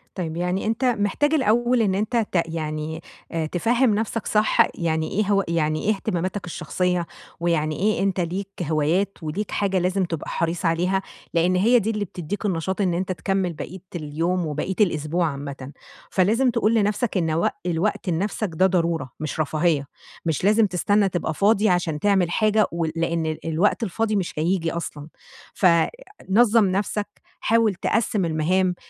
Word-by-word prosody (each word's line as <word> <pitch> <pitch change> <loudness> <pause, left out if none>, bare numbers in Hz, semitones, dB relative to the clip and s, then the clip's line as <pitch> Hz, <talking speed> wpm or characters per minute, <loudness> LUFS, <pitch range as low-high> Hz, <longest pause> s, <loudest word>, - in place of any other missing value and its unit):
طيب 165 -3 -4
يعني 180 +2 -1
أنت 225 +4 0
محتاج 245 +5 +1
الأول 240 -3 +3
إن 195 -4 +2
أنت 215 +4 0
ت 175 - +3
يعني، 160 -1 -4 0.3
آآ، 165 -1 -1
تفهّم 225 +8 +2
نَفْسك 220 0 -2
صح 215 0 +3
يعني 160 -2 -1
إيه 215 +2 +1
هو 200 0 +2
يعني 155 -2 0
إيه 215 - +3
اهتماماتك 185 +1 -3
الشخصية، 180 0 -1 0.3
ويعني 155 -3 0
إيه 210 +1 +1
أنت 195 -1 0
ليك 180 +3 -2 0.2
هوايات 165 +6 0
وليك 165 +7 -4
حاجة 195 -2 +1
لازم 185 +1 +1
تبقى 165 -3 -5
حريص 170 +2 -2
عليها، 180 +4 +1 0.3
لأن 175 +2 +2
هي 230 +7 +4
دي 220 0 -2
اللي 210 -2 -1
بتديك 180 +4 -5
النشاط 190 +1 -1
إن 185 -3 +1
أنت 185 +2 -2
تكَمّل 185 0 -1
بقيّة 180 +4 -7 0.2
اليوم 165 +3 -1
وبقيّة 155 +5 -3
الأسبوع 165 -2 +1
عامةً. 140 -1 -7 0.4
فلازم 220 +8 +3
تقول 230 -1 +2
لنَفْسك 210 +1 +1
إن 165 -3 +1
وق 160 +2 +1
الوقت 180 +3 -1
لنَفْسك 195 +4 -1
ده 185 +4 +4
ضرورة 165 -7 0
مش 155 0 -4
رفاهية، 155 -1 +1 0.4
مش 160 -1 -1
لازم 215 +3 +5
تستنى 200 +2 +2
تبقى 175 -3 -2
فاضي 210 +4 +3
عشان 175 -4 0
تعمل 195 -3 +2
حاجة 215 +2 +3
و 170 -1 -1
لأن 165 0 0
ال 155 -1 -2
الوقت 170 +8 +1
الفاضي 215 +2 -1
مش 190 -4 -1
هييجي 165 0 0
أصلًا. 155 -3 -5 0.5
فنظّم 220 - +2
نَفْسك، 200 +2 -1 0.3
حاول 225 -3 +3
تقسِّم 205 +1 0
المهام، 180 +3 +1
185 Hz, 160 wpm, -23 LUFS, 165-205 Hz, 0.5 s, لازم